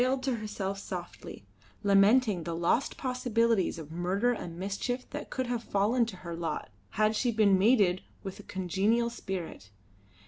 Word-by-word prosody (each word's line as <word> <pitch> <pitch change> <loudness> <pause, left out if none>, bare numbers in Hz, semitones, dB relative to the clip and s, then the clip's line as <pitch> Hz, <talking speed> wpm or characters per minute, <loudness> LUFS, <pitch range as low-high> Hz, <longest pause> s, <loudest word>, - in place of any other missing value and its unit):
She - - +4
wailed 260 0 0
to 260 -3 0
herself 200 -2 -4
softly, 175 - -7 0.4
lamenting 200 0 +4
the 165 0 -4
lost 170 +10 +1
possibilities 230 -7 +1
of 160 -2 -9
murder 185 +8 +1
and 170 -7 -6
mischief 200 +7 -3
that 295 - -6
could 260 - -2
have 240 -1 -2
fallen 225 +4 +2
to 215 - -6
her 170 -1 -4
lot 165 -1 -4 0.3
had 215 +1 +3
she 245 +2 +1
been 205 -4 +4
mated 200 -4 +4 0.2
with 195 0 -6
a - - -7
congenial 200 +7 0
spirit. 185 - -6
205 Hz, 165 wpm, -30 LUFS, 185-235 Hz, 0.4 s, She